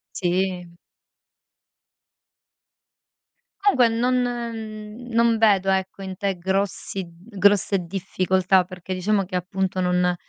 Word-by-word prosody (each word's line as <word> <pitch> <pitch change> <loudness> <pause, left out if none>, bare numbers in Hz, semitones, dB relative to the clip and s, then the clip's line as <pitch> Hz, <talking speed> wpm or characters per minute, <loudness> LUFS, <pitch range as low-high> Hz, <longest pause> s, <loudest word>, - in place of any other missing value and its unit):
Sì. 180 -1 -1 2.9
Comunque 265 - +5
non 240 +3 +1 1.0
non 230 0 +3
vedo 200 -3 +4
ecco 190 +1 -1
in 190 -1 -6
te 200 -2 -1
grossi 190 +1 -2
d 180 +6 -17
grosse 200 0 +4
difficoltà, 185 +1 +1
perché 185 0 -7
diciamo 195 +2 +1
che 185 0 -4
appunto 185 +1 -2
non 180 0 +2
190 Hz, 100 wpm, -23 LUFS, 180-200 Hz, 2.9 s, Comunque